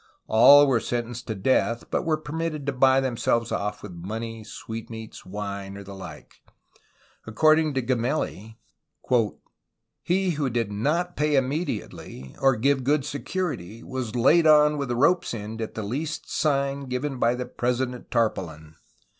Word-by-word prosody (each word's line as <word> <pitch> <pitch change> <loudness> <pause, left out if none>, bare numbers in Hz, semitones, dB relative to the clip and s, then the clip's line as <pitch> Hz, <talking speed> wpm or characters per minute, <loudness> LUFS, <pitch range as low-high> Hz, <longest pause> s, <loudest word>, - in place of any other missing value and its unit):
All 140 +6 +8
were 130 -4 +2
sentenced 120 +1 -4
to 110 - -3
death, 115 +2 0
but - - 0
were 155 -1 +2
permitted 155 -1 -4
to 145 - 0
buy 130 +1 +4
themselves 120 -2 0
off 105 0 -3
with 105 - -7
money, 110 +6 -6
sweet 110 +1 -8
meats, 110 -1 -9
wine, 100 0 -5
or 100 - -8
the 100 0 -10
like. 95 -1 -11 0.9
According 155 +6 +3
to 130 - 0
Gemelli: 120 -3 -2 1.4
"he 185 +2 +1
who 145 -4 -1
did 115 -3 -1
not 155 +12 -1
pay 150 0 +1
immediately, 135 - -3
or 135 -1 +4
give 135 +3 +1
good 140 +1 +1
security, 145 - -4
was 125 -3 -5
laid 155 +7 +5
on 150 -1 +5
with 140 -3 -3
a 120 - 0
rope's 165 +2 +2
end 110 +1 -6
at 110 - -5
the 110 - -3
least 145 +9 -4
sign 140 -2 0
given 130 +1 -3
by 120 +1 +3
the 125 0 -4
president 125 0 -2
tar 115 -2 +3
paulin. 80 -3 -9
125 Hz, 155 wpm, -25 LUFS, 110-145 Hz, 1.4 s, All